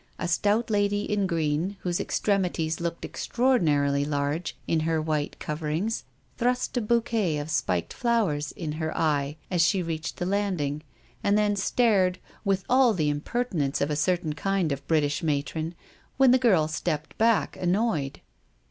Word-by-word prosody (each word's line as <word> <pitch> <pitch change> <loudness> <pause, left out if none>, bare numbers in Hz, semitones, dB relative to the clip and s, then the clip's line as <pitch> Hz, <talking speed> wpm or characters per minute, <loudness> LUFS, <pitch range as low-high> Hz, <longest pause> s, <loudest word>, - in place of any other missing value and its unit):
A 180 - -3
stout 210 +7 +1
lady 205 0 +1
in 205 -2 0
green, 165 +3 -1
whose 175 -1 -1
extremities 180 -6 0
looked 170 0 -3
extraordinarily 150 - +1
large 145 +3 -2
in 165 - +2
their 160 0 0
white 155 -2 -2
coverings, 155 +8 -2 0.3
thrust 250 +2 0
a 245 - +1
bouquet 220 -6 +1
of 145 +2 -4
spiked 90 - 0
flowers 205 -12 0
in 160 -4 -5
her 160 +1 -3
eye 150 -2 0
as 175 -2 +2
she 185 +2 +3
reached 165 -1 -4
the 175 - -2
landing, 180 -7 -1 0.4
and 200 +1 +3
then 210 -1 +2
stared, 195 -3 +2 0.3
with 195 -2 +1
all 250 -3 +4
the 150 -4 +1
imper 240 +12 -2
tinence 150 - -1
of 145 +2 0
a - - 0
certain 170 0 0
kind 190 0 0
of 140 0 -4
British 150 -3 +1
matron, 155 +2 -2 0.4
when 270 -2 +6
the 255 - +5
girl 190 -11 +4
stepped 155 0 -3
back 225 -1 +3
annoyed. 175 -7 0
170 Hz, 155 wpm, -26 LUFS, 150-205 Hz, 0.4 s, when